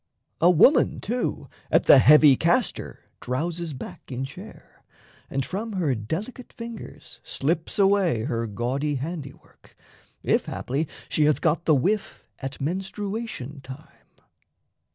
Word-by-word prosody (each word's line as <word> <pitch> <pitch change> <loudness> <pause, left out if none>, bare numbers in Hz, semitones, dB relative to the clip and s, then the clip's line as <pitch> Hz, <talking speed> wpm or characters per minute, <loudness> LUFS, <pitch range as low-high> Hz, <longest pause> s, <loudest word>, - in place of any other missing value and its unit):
A 170 - +5
woman, 180 - +5
too, 240 +4 -3 0.2
At - - +4
the 135 - +8
heavy 150 +1 +7
castor 185 - 0 0.2
drowses 165 +5 -3
back - - -10
in 130 +1 -3
chair, 180 +10 -13 0.5
And 135 -1 -2
from 215 +4 -4
her 170 -8 0
delicate 175 - -5
fingers 230 -1 -9
slips 160 +4 -2
away 195 - +3
Her 115 -3 -2
gaudy 130 +7 -2
handiwork, 140 0 -8 0.5
if - - +1
haply 140 +5 -2 0.2
she 150 - +2
Hath 150 -1 +3
got 165 +1 0
the 155 - +5
whiff 195 +10 -1 0.2
at 135 0 -6
menstruation 190 - -4
time. 135 +4 -13
155 Hz, 125 wpm, -25 LUFS, 135-195 Hz, 0.5 s, the